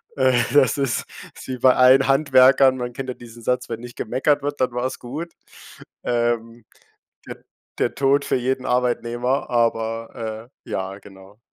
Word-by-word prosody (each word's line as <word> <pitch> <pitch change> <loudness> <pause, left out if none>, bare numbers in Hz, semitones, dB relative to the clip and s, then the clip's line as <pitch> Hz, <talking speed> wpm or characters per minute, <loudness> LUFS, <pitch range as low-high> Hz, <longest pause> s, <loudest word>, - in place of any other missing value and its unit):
äh, 130 -2 +3 0.2
das 135 -5 +4
ist 135 -4 -1 0.3
ist - - -12
wie 130 -1 -4
bei 130 +1 +4
allen 130 +1 +5
Handwerkern. 135 -1 +5
Man 125 -1 -5
kennt 130 +1 -6
ja 125 - -4
diesen 120 -1 -13
Satz: 125 +2 -1
„Wenn 115 -1 -5
nicht 120 0 -10
gemeckert 140 +5 0
wird, 145 -1 -3
dann 125 -1 +1
war's 125 +2 -3
gut.“ 155 +8 -7 0.7
Ähm, 120 -1 -2 0.6
de - - -7 0.4
der - - 0
Tod 140 +1 +2
für - - 0
jeden 130 +1 -1
Arbeitnehmer, 125 +1 -1
aber, 115 -1 -2 0.2
äh, - - -14
ja, 95 +1 -4
genau. 95 +1 -16
125 Hz, 160 wpm, -22 LUFS, 115-130 Hz, 0.7 s, allen